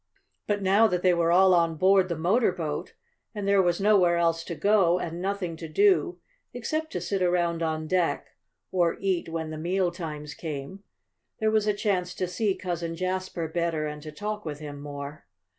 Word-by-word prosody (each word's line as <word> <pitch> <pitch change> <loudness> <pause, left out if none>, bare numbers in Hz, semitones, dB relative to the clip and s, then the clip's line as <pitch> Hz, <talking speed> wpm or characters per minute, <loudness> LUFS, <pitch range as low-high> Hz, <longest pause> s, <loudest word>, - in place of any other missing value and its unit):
But 205 -1 0
now 200 +4 +5
that 180 -4 -1
they 180 -1 +5
were 170 -1 +2
all 185 +1 +6
on 165 -2 +3
board 190 +2 +4
the 170 - -2
motor 190 +8 +2
boat, 160 -5 -5 0.4
and 205 -1 -3
there 200 -1 +5
was 175 -2 +1
nowhere 195 -4 +4
else 165 -1 +1
to 170 - -5
go, 195 -2 +3
and 170 -1 -4
nothing 190 -3 -2
to 165 - -7
do, 370 - +3 0.4
except 310 +6 -3
to - - -1
sit 195 -2 -2
around 175 -2 +1
on 160 -1 -1
deck, 180 +1 0 0.4
or 175 -2 +1
eat 190 -4 -1
when 160 -1 -4
the 155 - -6
meal 180 +2 0
times 150 -4 -6
came, 155 +5 -7 0.6
there 220 0 +2
was 215 -1 +2
a 210 - +3
chance 185 -4 -1
to 185 - -2
see 195 +2 0
Cousin 170 -2 -4
Jasper 185 -1 -3
better 165 -1 -1
and 150 0 -5
to 155 0 -8
talk 210 +4 -4
with 150 -3 -5
him 145 -1 -8
more. 145 -4 -8
175 Hz, 190 wpm, -27 LUFS, 165-195 Hz, 0.6 s, all